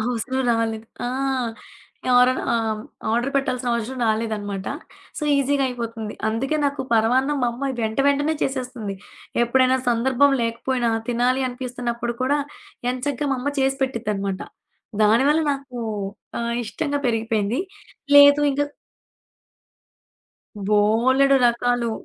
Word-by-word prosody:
అవసరం 245 +3 -1
రాలేదు. 225 -1 -1 0.2
ఆ! - - -1 1.0
ఎవరన్నా 250 +1 +4
ఆహ్, 230 -1 +1
హ్మ్. - - -8 0.3
ఆర్డర్ 240 +4 +1
పెట్టాల్సిన 255 -2 -1
అవసరం 235 +3 -3
రాలేదనమాట. 215 -3 -2 0.5
సో, - - -6
ఈజీగా 280 0 +2
అయిపోతుంది. 230 -3 -5
అందుకే 265 +7 -1
నాకు 280 -1 0
పరవాన్నం 255 +6 +2
మా 245 - +3
అమ్మ 240 +4 -9
అది 245 -2 -4
వెంట 220 +2 -3
వెంటనే 290 +3 +1
చేసేస్తుంది. 250 -6 -3 0.5
ఎప్పుడైనా 260 +2 +3
సందర్భం 260 +4 +3
లేకపోయినా 235 +1 -1 0.2
తినాలి 245 +2 +1
అనిపిస్తున్నప్పుడు 245 -1 -4
కూడా 285 +3 +2 0.5
ఎంచగ్గా, 280 +2 -2
మా - - 0
అమ్మ 285 +3 -2
చేసి 270 0 +1
పెట్టిద్దనమాట. 210 -7 -2 0.6
దానివల్ల 265 +9 +4
నాకు 270 -3 -7 0.6
ఆహ్, 235 0 -2
ఇష్టంగా 285 +5 -2
పెరిగిపోయింది. 225 +1 0 0.6
లేదు 285 0 +8
ఇంక 275 - -2 2.1
బోలెడు 235 +7 +4
రకాలు. 240 0 +1
245 Hz, 115 wpm, -22 LUFS, 230-270 Hz, 2.1 s, లేదు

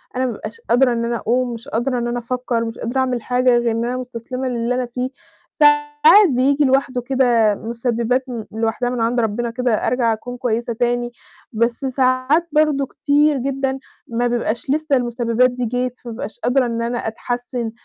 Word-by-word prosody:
أنا 260 +1 0
ما 245 - -1
بابقاش 215 +1 -8
قادرة 245 +1 +4
إن 235 0 -1
أنا 235 0 -1
أقوم، 245 +2 0
مش 230 0 -9
قادرة 250 +2 -1
إن 240 - -2
أنا 240 0 -2
أفكر، 240 -1 -2
مش 225 - -6
قادرة 240 +3 -2
أعمل 255 -3 0
حاجة، 250 +1 +2
غير 235 -1 +1
إن 230 +1 -1
أنا 250 +1 -2
مستسلمة 255 +1 -5
للي 240 0 -1
أنا 250 -1 -1
فيه. 250 +2 -3 0.5
ساعات 295 +6 +5
بييجي 275 +3 +2
لوحده 265 -1 +1
كده 240 -5 +2
مسببات 235 +3 -1
م 235 -3 -4
لوحدها 225 +2 -1
من 245 -2 -2
عند 235 +2 +1
ربنا 235 +1 -1
كده، 245 -1 0
أرجع 240 -3 +2
أكون 245 +3 -7
كويسة 235 -1 -1
تاني، 240 +1 -1 0.4
بس 235 +3 -1
ساعات 260 +5 +2
برضه 300 -2 +2
كتير 290 +2 +2
جدًا 270 +1 -2 0.3
ما 240 +1 0
بيبقاش 235 0 -2
لسّه 305 0 +1
المسببات 240 0 +1
دي 250 0 -3
جت، 250 +2 -2
فما 240 - -9
بابقاش 220 - -7
قادرة 250 +1 +2
إن 230 -1 -2
أنا 235 +1 -2
أتحسن، 240 +1 -4
245 Hz, 185 wpm, -20 LUFS, 235-260 Hz, 0.5 s, ساعات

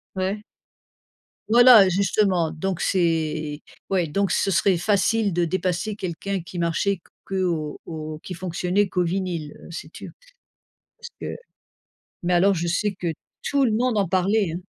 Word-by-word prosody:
Ouais. 195 +3 -2 1.1
Voilà! 240 -4 +8
Justement 185 -3 +1
donc 180 +3 -3
c'est 160 -4 0 0.3
ouais 180 -4 +1
donc 195 +4 0
ce 195 - +1
serait 190 +2 +3
facile 205 +3 +2
de 175 0 +1
dépasser 185 +4 -1
quelqu'un 190 +1 -4
qui 170 +1 -8
marchait 170 +3 0 0.2
qu'au 175 -6 -2
au 155 -2 -6
qui 185 - -7
fonctionnait 180 +2 -1
qu'au 180 0 +1
vinyle, 170 -4 -3
heu, - - -11
si - - -7
tu - - -10 0.9
parce - - -10
que - - -5 0.9
mais 175 +1 +1
alors 195 +3 +4
je 170 0 -2
sais 200 +4 0
que 180 -2 -7 0.4
tout 280 -1 +2
le 230 - +2
monde 235 +1 +1
en 200 -2 +2
parlait 190 +1 +1
hein. - - -6
185 Hz, 150 wpm, -23 LUFS, 170-200 Hz, 1.1 s, Voilà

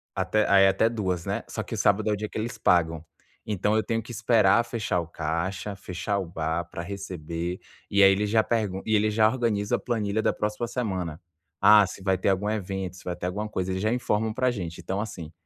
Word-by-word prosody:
até 95 +3 +1
aí 95 -1 +7
até 95 +3 +3
2h00 95 -7 -2
né, - - -2
só - - -4
que - - -8
o - - -6
sábado 105 +2 +2
é - - +2
o - - +1
dia 105 +1 -4
que - - -7
eles 115 +1 -4
pagam. 80 -5 +2 0.5
Então, 105 +1 +1
eu 110 - +2
tenho 115 -1 -1
que 120 - -10
esperar 110 -1 +4
fechar 105 -7 -1
o 85 - -8
caixa, 85 +6 -3
fechar 95 +2 -3
o 95 - -3
bar 80 0 -2
para 85 - -6
receber 90 -2 -5 0.3
e 100 0 +5
aí 95 - +8
eles 105 +2 0
já 110 +1 +4
pergu 105 -5 -1
e 110 - +2
eles 105 0 +2
já 110 0 +5
organizam 110 -4 0
a - - -9
planilha 110 -3 -1
da - - +2
próxima 105 +3 -2
semana. 95 -10 -3 0.4
Ah, 105 0 +8
se 95 - -9
vai 95 -1 +2
ter 95 - +1
algum 100 +2 +1
evento, 95 -3 -3
se - - -14
vai 90 - -2
ter - - -6
alguma 105 +4 -3
coisa, 95 -2 -2
eles 95 0 -2
já 110 +2 +1
informam 110 -3 0
para 130 +2 +1
gente. 85 -7 -5
Então, 95 +2 -2
assim, 90 -8 -7
100 Hz, 235 wpm, -26 LUFS, 90-110 Hz, 0.5 s, aí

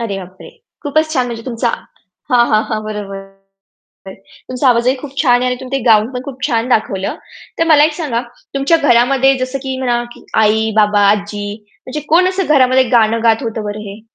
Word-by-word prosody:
अरे, 200 -4 -3
बापरे! 185 0 -12 0.3
खूपच 310 +2 0
छान! 255 -4 0
म्हणजे 230 -1 -6
तुमचा 235 -1 -1 0.6
हां, 240 -1 +4
हां, 215 0 +3
हां. 215 -2 -3
बरोबर. 195 -2 -6 1.2
तुमचा 255 +1 0
आवाजही 245 +2 +3
खूप 275 -1 -10
छान 245 -4 +3
आहे - - 0
आणि 250 - -2
तुम्ही 260 +1 -3
ते - - -7
गाऊन 220 0 +4
पण 250 - -5
खूप 265 -2 -9
छान 230 +1 -1
दाखवलं. 195 -5 -1 0.4
तर 330 - +3
मला 300 -2 +6
एक 310 - +1
सांगा 290 -8 -2 0.3
तुमच्या 275 +5 +2
घरामध्ये 270 0 +3
जसं 255 +1 -3
की 265 -1 -4
म्हणा 240 -2 0 0.4
आई-बाबा, 215 -1 +2
आजी 205 0 -3 0.3
म्हणजे 280 +4 -4
कोण 360 +3 +4
असं 375 0 -2
घरामध्ये 260 -1 +4
गाणं 225 0 +2
गात 225 +3 +3
होतं 225 -2 -4
बरं 205 0 -5
हे? 200 +2 -10
240 Hz, 180 wpm, -15 LUFS, 215-270 Hz, 1.2 s, मला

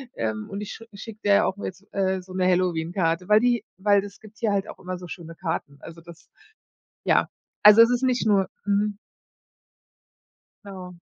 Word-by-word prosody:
ähm, 110 -1 -3
und 200 - -5
ich 210 - -6
sch 225 - -11
schicke 215 +1 -10
der 200 -1 +4
auch 190 - -3
jetzt, 200 +2 -7
äh, 190 -1 0
so 185 0 -13
'ne 185 -1 0
Halloween-Karte, 175 0 0
weil 210 +1 +7
die 240 0 +1
weil 200 0 +3
das 205 0 -10
gibt 215 0 -16
hier 220 -3 +1
halt 195 -1 0
auch - - -9
immer 185 -1 -5
so 180 0 -10
schöne 165 -1 -9
Karten. 160 -5 -4
Also, 165 0 -11
das, 170 0 -15 0.8
ja - - +3 0.3
also, 210 +2 +9
es 230 - +8
ist 245 +1 0
nicht 255 -3 +1
nur 195 -3 +3 0.2
mhm. 205 0 +1 1.7
Ja. 185 -3 -9
195 Hz, 185 wpm, -24 LUFS, 180-210 Hz, 1.7 s, also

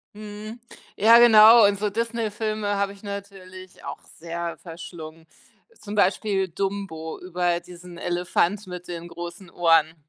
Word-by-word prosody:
Mhm. 215 +2 -9 0.3
Ja 225 +3 +7
genau 225 -1 +8
und 200 -1 0
so 210 +1 -1
Disney 230 0 -2
Filme 215 -1 -2
habe 200 0 -1
ich 200 - -18
natürlich 195 -2 -9
auch - - -7 0.2
sehr 170 0 -5
verschlungen, 165 -1 -10 0.5
zum 205 -1 -9
Beispiel 195 0 +1
Dumbo, 190 -3 -5
über 175 -1 -1
diesen 175 0 -13
Elefant 180 +3 -1
mit 180 -1 -9
den 170 -1 -7
großen 175 +1 -9
Ohren. 165 -2 +3
190 Hz, 135 wpm, -24 LUFS, 175-210 Hz, 0.5 s, genau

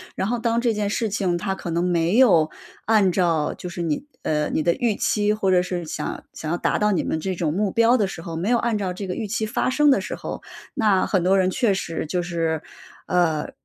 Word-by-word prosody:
然 - - -1
后 240 0 -1
当 230 0 +1
这 240 -1 +2
件 210 -2 -1
事 220 +2 -1
情 185 -3 0
它 190 +2 -2
可 190 - -6
能 170 +1 0
没 175 +2 +1
有 175 -12 +5 0.4
按 210 -4 +4
照 170 -4 +1
就 - - -8
是 175 0 -5
你 165 - -2 0.2
呃， 150 -1 0
你 155 - 0
的 170 - +3
预 235 -2 0
期， 210 +1 +1
或 200 -3 0
者 180 -1 +4
是 180 -1 -3
想 155 - -5
想 155 - -6
要 170 - +1
达 - - 0
到 210 0 +2
你 180 - 0
们 160 - -2
这 190 +3 -3
种 160 -3 -1
目 200 +2 0
标 230 +4 +4
的 205 -4 +1
时 175 - -7
候 165 -1 -6
没 180 +6 -1
有 245 - +4
按 235 -2 0
照 190 -3 -2
这 195 +2 -6
个 185 - -3
预 220 +1 -4
期 220 +2 -1
发 220 - -1
生 295 +2 +4
的 270 - +4
时 - - -5
候， - - -6 0.3
那 205 -4 +3
很 190 -4 +1
多 190 +1 +4
人 185 -1 +3
确 230 -1 +2
实 170 -4 -3
就 175 +3 -2
是 165 -3 -1 0.5
呃， 165 -4 +1
190 Hz, 270 characters per minute, -23 LUFS, 170-215 Hz, 0.5 s, 有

